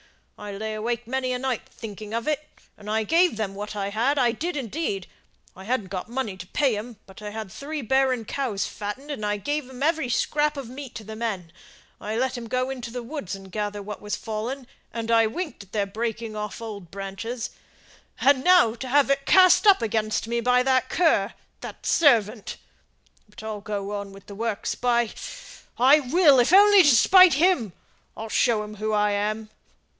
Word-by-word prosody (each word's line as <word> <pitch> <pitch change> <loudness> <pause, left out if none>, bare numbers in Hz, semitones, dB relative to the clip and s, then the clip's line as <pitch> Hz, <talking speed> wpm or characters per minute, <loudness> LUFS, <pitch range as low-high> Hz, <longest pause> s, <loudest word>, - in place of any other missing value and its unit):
I 210 0 -7
lay 215 +2 -4
awake 235 +2 -3
many 255 +1 -2
a - - -1
night 255 -1 -3
thinking 215 0 -8
of 230 +3 -3
it, 305 0 0 0.3
and 210 0 -11
I 220 +1 +1
gave 335 - +3
them 210 -3 -2
what 210 +1 -6
I 200 -1 -2
had 240 +8 0
I 245 -3 +3
did, 320 +8 -4
indeed. 230 - -3 0.5
I 190 - -11
hadn't 220 -4 -1
got 190 +2 -5
money 240 -5 -3
to 185 - -9
pay 270 -1 +1
'em, 220 +2 -7
but 190 +2 -14
I 210 - -5
had 215 -2 -7
three 295 +4 -5
barren 260 -1 +1
cows 235 -5 -2
fattened, 245 +8 -6
and 210 -6 -3
gave 290 -2 -2
every 320 -4 +1
scrap 295 +4 +1
of 275 -4 -5
meat 260 +1 -9
to 220 - -7
the 220 +1 -8
men, 195 -8 -4 0.5
and 210 - -8
I 220 - -1
let 260 0 -1
'em 230 - -8
go 255 +3 -1
into 250 -3 -6
the 245 +1 -6
woods 235 - -5
and 195 -1 -12
gather 205 0 -3
what 210 0 -7
was 210 0 -3
fallen, 230 +5 -5 0.3
and 230 0 -4
I 225 -1 +5
winked 310 +6 -5
at 200 -1 -15
their 205 -2 +1
breaking 225 +1 -4
off 210 -1 -5
old 205 -6 -8
branches, 200 +5 -5 0.7
and 265 -1 +4
now 360 -11 +5
to 250 +3 -7
have 275 +1 +3
it 275 0 0
cast 370 +2 +6
up 385 - +6
against 215 0 -1
me 235 +1 -1
by 250 +1 +3
that 260 0 +2
cur 320 - +2 0.2
that - - -9
servant. 230 -8 +2 0.7
But 210 - -13
I'll 215 -2 -5
go 200 -1 -4
on 200 -1 -5
with 195 0 -14
the 205 - -10
works, 220 0 -2
by, 240 -2 +1 0.7
I 270 +5 +6
will, 290 0 +4
if 245 +5 +3
only 405 +1 +8
to 290 -7 +6
spite 370 - +7
him. 295 - +2 0.4
I'll 220 0 -6
show 220 -1 +2
him 210 0 -9
who 215 +1 -2
I 210 -1 +2
am. 215 +1 -2
230 Hz, 200 wpm, -25 LUFS, 210-265 Hz, 0.7 s, only